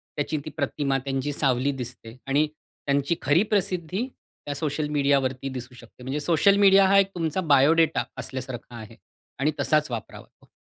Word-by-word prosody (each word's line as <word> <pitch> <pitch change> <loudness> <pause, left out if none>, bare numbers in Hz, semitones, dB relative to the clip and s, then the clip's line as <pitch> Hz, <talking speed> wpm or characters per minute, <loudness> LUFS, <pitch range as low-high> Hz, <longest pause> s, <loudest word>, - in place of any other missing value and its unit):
त्याची 150 +1 -2
ती - - -5
प्रतिमा 140 -1 0
त्यांची 135 +1 -2
सावली 135 -1 +1
दिसते 125 -3 -8
आणि 145 +3 +2
त्यांची 140 +3 -2
खरी 145 +7 +3
प्रसिद्धी 190 +2 -1
त्या 145 - -10
सोशल 150 +1 -2
मीडियावरती 140 -2 +1
दिसू 125 -1 -8
शकते. 120 +1 -15
म्हणजे 135 +4 -3
सोशल 170 +6 +3
मीडिया 195 -1 +6
हा 195 +1 +5
एक 195 - +3
तुमचा 165 +1 -1
बायोडेटा 160 +4 +3
असल्यासारखा 130 -2 -7
आहे 110 -2 -10 0.4
आणि 150 +3 +2
तसाच 150 -3 +1
वापरावा. 115 -2 -9
145 Hz, 155 wpm, -25 LUFS, 130-160 Hz, 0.4 s, मीडिया